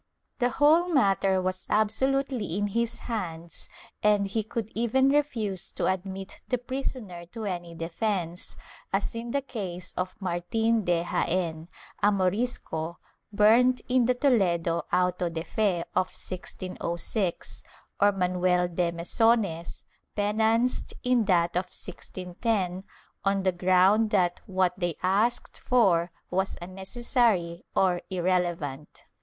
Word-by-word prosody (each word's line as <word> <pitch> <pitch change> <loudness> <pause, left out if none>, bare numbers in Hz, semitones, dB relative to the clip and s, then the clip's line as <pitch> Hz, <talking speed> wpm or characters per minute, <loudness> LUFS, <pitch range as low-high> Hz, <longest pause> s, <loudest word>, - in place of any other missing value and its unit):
^ - - -44
The 245 -1 +3
whole 310 +7 +4
matter 195 - +3
was 185 0 -2
absolutely 230 -1 +1
in 205 0 0
his 235 +2 0
hands 170 -7 -5 0.3
and 210 -1 +3
he 195 +3 -1
could 220 0 -4
even 250 +4 +2
refuse 230 -10 0
to - - -1
admit 190 +1 -3
the 250 - +1
prisoner 245 -8 -5
to 220 +4 -7
any 175 -3 -4
defence, 175 +1 -3 0.4
as 195 +1 0
in 230 +1 -5
the 280 +3 -1
case 185 -8 -5
of 185 0 -3
Martin 210 +5 0
de 175 -1 +2
Jaen, 170 -2 -1 0.3
a 205 - +5
Morisco, 185 -4 -1 0.3
burnt 230 +5 +5
in 250 -1 +3
the 250 - +3
Toledo 175 - +2
auto 180 0 +1
de 165 -1 -4
fe 190 -3 0
of 185 0 +3
1606, 185 +1 -4 0.4
or 205 0 +6
Manuel 180 -1 +1
de 175 0 0
Mesones, 170 0 +1 0.3
penanced 220 +4 +1
in 250 -3 +3
that 175 -3 +3
of 180 +1 +1
1610, 185 +1 -3 0.4
on 195 -1 +1
the 190 - +3
ground 185 +4 +4
that 180 -4 +1
what 185 -2 +1
they 175 -3 -1
asked 210 +6 +1
for 180 -9 +3 0.2
was 190 +2 0
unnecessary 190 -1 0
or 180 -2 +3
irrelevant. 175 -6 -2
190 Hz, 125 wpm, -27 LUFS, 175-225 Hz, 0.4 s, or